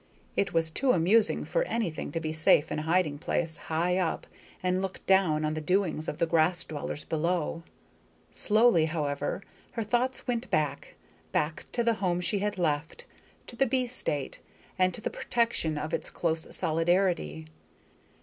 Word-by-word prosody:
It 195 -2 +1
was 165 -1 +1
too 255 +9 +2
amusing 205 +6 +3
for - - 0
anything 195 - -2
to 165 - -1
be 155 -1 -3
safe 155 0 +4
in - - -1
a 155 +1 -5
hiding 165 -5 +2
place, 160 0 -1
high 175 +3 0
up, 175 -3 -1 0.4
and 185 0 +1
look 190 -1 -5
down 175 -6 +3
on 155 - 0
the 155 - -3
doings 175 -2 0
of 150 - -3
the 170 - +2
grass 165 +2 +2
dwellers 150 -1 -5
below. 165 0 -1 0.7
Slowly, 215 -6 +4
however, 155 +2 -2 0.3
her 230 - -2
thoughts 245 +4 0
went 245 0 -2
back 150 -2 -1 0.4
back 155 +4 -1
to 240 - +1
the 230 0 +3
home 175 -2 +1
she 180 +3 0
had 205 0 -2
left, 160 - -1 0.4
to - - -10
the 270 +3 +2
bee 255 +1 +1
state, 150 - -1 0.4
and 185 0 +4
to - - -9
the - - -3
protection 230 -10 0
of 155 +1 -4
its - - -2
close 160 -1 -1
solidarity. 165 - +1
175 Hz, 170 wpm, -28 LUFS, 155-205 Hz, 0.7 s, safe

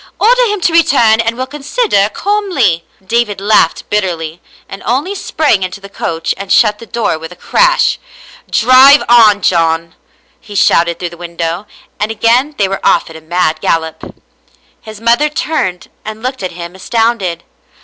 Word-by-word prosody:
Order - - +4
him 420 -2 -2
to 340 - +1
return 240 -9 +4
and 230 +1 -2
we'll 255 - -2
consider 290 - 0
calmly." 285 - -1 0.2
David 220 -1 -1
laughed 200 -4 +1
bitterly, 175 -5 -2 0.3
and 195 - -9
only 275 - -1
sprang 310 - 0
into 185 +1 -4
the 200 0 -12
coach 165 -4 -3
and 195 0 -7
shut 210 -2 +3
the 230 - -12
door 230 -9 -2
with 160 +1 -9
a - - -11
crash. - - +1 0.3
" - - -22
Drive 260 +4 +6
on, 215 -4 +5
John," 165 -1 +1 0.5
he 205 -3 -12
shouted 170 -3 +2
through 175 - -4
the 170 - -12
window, 170 +2 -5 0.3
and 210 - -1
again 240 +6 +1
they 200 - +1
were 195 0 -5
off 165 - +2
at - - -12
a 160 - -10
mad 160 -1 -1
gallop. 160 -1 -3 0.7
His 215 -2 -11
mother 235 +6 +2
turned 295 - -3
and 215 +1 -8
looked 255 -1 -4
at 185 -2 -4
him 170 0 -8
astounded. 195 -3 -1
210 Hz, 170 wpm, -13 LUFS, 175-255 Hz, 0.7 s, Drive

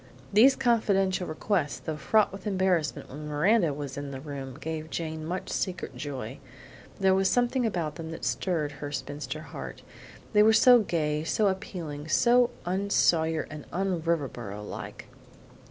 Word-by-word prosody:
These 255 +6 +7
confidential 200 -7 +2
requests, 155 -1 -1
though 160 - -5
fraught 205 +9 +2
with 195 +2 -7
embarrassment 185 -5 0
when 150 +3 -7
Miranda 165 +4 +3
was 140 -1 -6
in 140 0 -4
the 135 -1 -6
room, 135 -2 -7
gave 160 0 -5
Jane 160 -1 -4
much 180 +4 -4
secret 185 -3 -3
joy; 135 -7 -6 0.6
there 190 -1 +4
was 190 0 +3
something 245 0 +2
about 170 -7 -2
them 165 -1 -6
that 165 - -6
stirred 160 -6 -1
her 145 -1 -7
spinster 145 +1 -5
heart - - -8 0.5
they 210 - +6
were 220 +1 +6
so 245 +2 +7
gay, 155 -7 -1
so 200 +6 +2
appealing, 170 -6 -5
so 240 +8 +4 0.2
un 190 +3 -1
Sawyer, 160 -4 +2 0.2
un 185 -2 -1
Riverboro 120 -11 -3
like. - - -7
165 Hz, 155 wpm, -28 LUFS, 150-195 Hz, 0.6 s, These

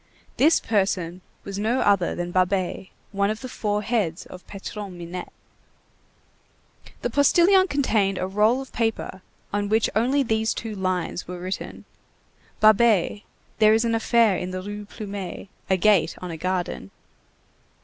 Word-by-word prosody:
This 310 +5 +5
person 185 -4 -1 0.2
was 200 0 -6
no 230 +5 +1
other 200 -4 +2
than 175 0 -4
Babet, 185 0 0 0.2
one 200 0 +1
of 215 +1 -3
the 260 - -5
four 210 -3 -2
heads 200 -8 -1
of 180 - -12
Patron 200 -1 -7
Minette. 175 +1 -7 1.7
The - - -1
postilion 360 +7 +5
contained 220 - +1
a 185 - -1
roll 210 +7 +2
of 265 - -11
paper 225 -4 -2 0.3
on 205 0 -1
which 220 +1 +2
only 260 +6 +2
these 220 -2 0
two 225 -2 -5
lines 185 -2 -2
were 180 0 -6
written:— 185 +2 -6 0.8
"Babet. 215 -2 +4 0.4
There 215 0 +6
is 225 +1 +1
an 230 - +1
affair 225 -2 +3
in 180 - -4
the 185 0 -5
Rue 205 +1 -6
Plumet. 200 -3 -7 0.2
A 190 - +3
gate 205 -1 +3
on 180 -1 -6
a - - -5
garden." 180 - -3
205 Hz, 150 wpm, -24 LUFS, 185-225 Hz, 1.7 s, There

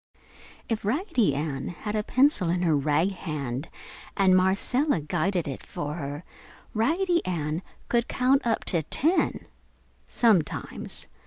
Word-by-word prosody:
If 225 -2 -2
Raggedy 245 - +1
Ann 140 -2 -3
had 180 +5 -5
a 215 - +1
pencil 255 - +3
in 175 +1 0
her 165 -3 +3
rag 150 +6 +2
hand 145 -6 -4 0.5
and 190 -2 +5
Marcella 200 - +2
guided 175 +3 -1
it 135 - -5
for 145 0 -5
her, 145 0 -5 0.5
Raggedy 340 - +1
Ann 160 -2 -2 0.3
could 240 0 +1
count 260 +2 +2
up 225 - 0
to 170 -4 +2
ten 310 - +1 0.6
sometimes. 210 -10 +1
185 Hz, 130 wpm, -26 LUFS, 150-235 Hz, 0.6 s, and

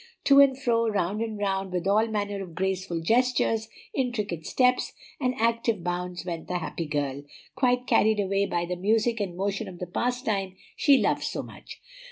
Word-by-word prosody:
To 280 0 +6
and 270 -1 +5
fro, 230 -3 +2
round 205 +1 -1
and 220 -2 -3
round, 195 -2 -1
with 180 -1 -2
all 215 +3 +3
manner 205 -2 -2
of 175 -4 -9
graceful 185 -2 -2
gestures, 225 +1 +1 0.2
intricate 210 - -2
steps, 250 -1 +2 0.3
and 255 -2 0
active 230 -3 +1
bounds 180 0 -3
went 170 -2 -5
the 180 - -1
happy 165 -1 -4
girl, 145 -2 -2 0.3
quite 250 -1 +2
carried 220 -3 +3
away 200 0 +1
by 175 0 -1
the 180 +1 -3
music 220 +5 +1
and 185 -4 -3
motion 200 +2 -2
of 185 -2 -9
the 180 - -4
pastime 205 - -2 0.2
she 285 -2 +5
loved - - +1
so - - -3
much. - - -12
205 Hz, 180 wpm, -27 LUFS, 180-230 Hz, 0.3 s, To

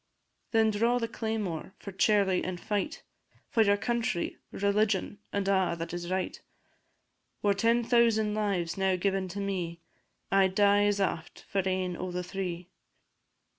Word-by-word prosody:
Then 220 -1 +3
draw 230 +4 +2
the 230 -1 -1
claymore, 215 -7 -3
for 200 - -8
Charlie 195 -1 +3
then 185 0 -3
fight; 210 - -3 0.5
For 225 - +3
your 205 -1 +4
country, 230 -4 -1
religion, 200 0 0
and 200 -1 -1
a' 190 -3 +2
that 165 0 -5
is 175 0 -4
right; 185 0 -2 1.0
Were 205 -1 +4
ten 230 +4 +2
thousand 225 -3 +3
lives 195 -5 -1
now 190 -1 +2
given 190 +1 0
to 195 +3 -6
me, 180 -4 -3 0.5
I 195 -1 +5
'd 185 - -9
die 205 0 +5
as 205 0 +1
aft 170 -4 -2
for 195 - 0
ane 185 -1 -1
o' 185 - -4
the 180 0 -3
three. 180 -1 -5
195 Hz, 155 wpm, -29 LUFS, 185-215 Hz, 1.0 s, I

